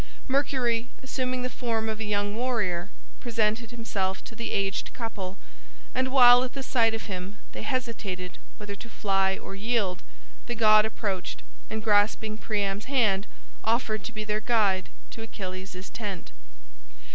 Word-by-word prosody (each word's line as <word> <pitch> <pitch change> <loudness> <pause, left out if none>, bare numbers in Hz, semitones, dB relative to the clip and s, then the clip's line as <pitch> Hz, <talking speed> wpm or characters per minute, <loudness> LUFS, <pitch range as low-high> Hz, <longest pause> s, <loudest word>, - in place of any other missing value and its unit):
Mercury, 255 -4 +1
assuming 255 -1 -1
the - - +1
form 225 -3 -1
of 220 -1 -2
a - - -2
young 205 -1 0
warrior, 210 -7 0 0.3
presented 225 -1 0
himself 205 -5 -2
to - - -10
the 230 +1 -4
aged 195 0 -1
couple, 200 -5 -4 0.6
and 260 0 +2
while 245 -2 +9
at 255 - -4
the 270 - -4
sight 230 -4 +3
of 225 - -4
him 190 +1 -5
they - - -6
hesitated 220 -9 -3 0.2
whether 205 -1 -6
to 230 +4 -10
fly 195 -3 +1
or - - -8
yield, 200 -2 0 0.5
the 240 - -2
god 215 -1 +7
approached, 200 -4 -3 0.3
and 220 0 -3
grasping 215 0 +3
Priam's 205 -2 -1
hand 220 -7 +3 0.4
offered 220 -2 +1
to - - -4
be 215 -2 -4
their 210 0 -1
guide 210 -5 +2 0.2
to 225 - -8
Achilles' 185 -3 -6
tent. 200 - -5
215 Hz, 150 wpm, -28 LUFS, 195-235 Hz, 0.6 s, while